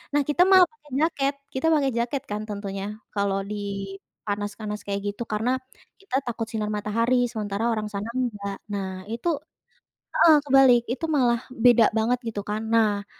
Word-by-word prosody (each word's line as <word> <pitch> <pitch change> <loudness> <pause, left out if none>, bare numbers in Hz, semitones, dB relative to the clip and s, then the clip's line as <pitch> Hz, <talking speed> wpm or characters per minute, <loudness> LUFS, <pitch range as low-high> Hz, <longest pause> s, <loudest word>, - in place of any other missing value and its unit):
Nah, 290 - +4
kita 320 +4 +2
malah 375 -1 +9
pakai 300 -2 -22
jaket. 280 -4 +1 0.2
Kita 260 +4 -2
pakai 275 -3 +2
jaket 245 +3 -1
kan 210 +1 -2
tentunya, 200 -1 -4 0.3
kalo 200 -1 0 0.2
di - - -2 0.7
panas-panas 210 +1 -4
kayak 200 0 -1
gitu 235 - -6
karena 225 +4 +1 0.5
kita 390 -9 -5
takut 225 -2 -3
sinar 215 -2 -2
matahari 230 +4 +1 0.2
sementara 210 -1 -3
orang 215 -1 -2
sana 200 +2 -3
enggak. 205 -6 -2
Nah, 190 -2 -4
itu 235 +9 -4 0.9
heeh 320 -2 +7
kebalik, 265 -3 +6
itu 325 +5 -4
malah 240 -3 +3 0.3
beda 235 -2 +7
banget 240 +3 +1
gitu 210 -2 -3
kan. 215 +1 -1
Nah, 210 -3 +2
225 Hz, 160 wpm, -25 LUFS, 205-255 Hz, 0.9 s, malah